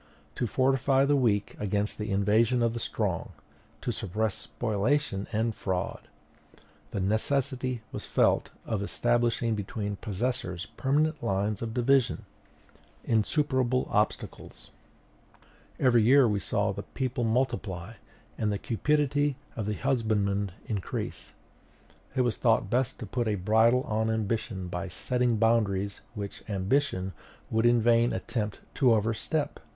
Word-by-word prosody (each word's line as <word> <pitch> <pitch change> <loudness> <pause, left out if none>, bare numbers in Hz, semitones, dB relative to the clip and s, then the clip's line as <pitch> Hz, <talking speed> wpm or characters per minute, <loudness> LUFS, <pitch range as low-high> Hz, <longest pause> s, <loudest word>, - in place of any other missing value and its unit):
To 120 - -1
fortify 135 +2 +3
the 145 +1 +3
weak 110 -7 +1
against 105 +1 -1
the 105 +1 -3
invasion 110 +5 +3
of 115 -1 +2
the 115 - -3
strong, - - -2 0.5
to - - -1
suppress 110 +3 -1
spoliation 110 -1 -1
and 110 +1 0
fraud, 95 -3 -3 0.8
the 100 - -3
necessity 125 +4 0
was - - -6
felt - - +2 0.2
of 110 -3 -2
establishing 120 +2 +1
between 105 -1 -3
possessors 105 -4 -3
permanent 150 +3 +1
lines 100 0 -1
of 115 -1 -4
division, 130 +1 +2 0.8
insuperable 130 +2 +1
obstacles. - - -2 1.1
Every 120 -3 +5
year 130 +3 +6
saw - - 0
the - - -5
people 130 -2 -3
multiply, 110 -5 -1 0.5
and 105 -2 +1
the 100 - 0
cupidity 145 +5 +1 0.2
of 110 -2 -3
the 105 - -1
husbandman 105 -6 0
increase: 100 -5 -4 0.8
it 130 - +3
was 120 -2 +1
thought 115 -3 +2
best 130 +1 +1
to - - -3
put 120 +3 -2
a 105 - +1
bridle 110 +6 +3
on 110 +1 0
ambition 110 -3 -2
by 90 +2 -4
setting 125 +4 0
boundaries 105 -3 +1
which 100 -2 -6
ambition 95 -1 0 0.4
would 115 +1 +3
in 120 -2 +4
vain 120 +1 +4
attempt 105 -4 -3
to 125 -5 +4
overstep. 115 +8 -1
115 Hz, 125 wpm, -28 LUFS, 105-125 Hz, 1.1 s, year